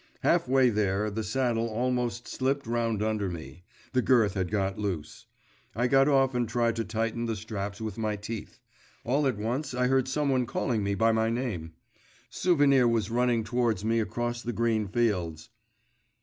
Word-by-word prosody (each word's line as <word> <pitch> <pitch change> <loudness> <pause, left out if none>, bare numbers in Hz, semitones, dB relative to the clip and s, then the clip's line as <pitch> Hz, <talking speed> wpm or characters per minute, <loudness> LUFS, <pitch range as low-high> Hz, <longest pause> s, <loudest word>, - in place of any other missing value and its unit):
Half - - +2
way 130 -1 +4
there, 105 0 0
the 110 +2 -3
saddle 115 +1 0
almost 120 +1 -1
slipped 135 +2 -1
round 115 -2 0
under 110 -3 -1
me; 80 -2 -8 0.3
the 130 - +3
girth 115 -7 +3
had 95 -3 -2
got 100 -2 -1
loose; 95 -7 -4 0.5
I 120 +3 +1
got 135 +2 +4
off 135 -2 +3
and 120 -2 -1
tried 115 0 +1
to 115 - 0
tighten 115 +1 -2
the 115 - -1
straps 105 -1 -5
with 110 0 -5
my 110 -1 -1
teeth.… 105 +1 -7 0.4
All 140 +4 +1
at 125 -5 -1
once 125 +6 -2
I 125 0 +1
heard 130 0 +2
someone 135 -3 +1
calling 115 -3 -1
me 100 0 0
by 115 +3 +3
my 110 0 +1
name.… 110 -10 -3 0.6
Souvenir 140 -8 +4
was 115 -1 0
running 120 -1 +2
towards 115 -3 0
me 115 +1 +2
across 120 +2 -2
the 120 0 -4
green 110 -2 0
fields. 95 -8 -1
115 Hz, 175 wpm, -28 LUFS, 105-125 Hz, 0.6 s, way